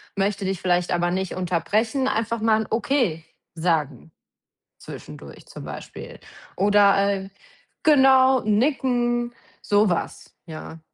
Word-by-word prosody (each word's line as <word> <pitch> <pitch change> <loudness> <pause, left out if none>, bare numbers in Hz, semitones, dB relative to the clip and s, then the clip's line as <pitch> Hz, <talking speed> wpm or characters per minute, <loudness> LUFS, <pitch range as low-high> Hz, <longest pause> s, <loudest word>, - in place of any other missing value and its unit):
möchte 195 0 -1
dich 190 -2 -3
vielleicht 180 -1 0
aber 175 0 0
nicht 190 0 -2
unterbrechen“, 210 - -1
einfach 230 -1 -1
mal 220 0 +2
'n - - -12
„Okay“ 225 - 0 0.3
sagen 160 -4 -2 0.7
zwischendurch - - -11
zum - - -11
Beispiel - - -9 0.4
oder, 200 0 +4 0.2
äh 195 0 -5 0.5
genau, 265 -3 +5
nicken, 240 +1 0 0.3
so 205 0 +2
was, 175 - -4
ja. 160 0 -9
205 Hz, 115 wpm, -23 LUFS, 180-240 Hz, 0.7 s, genau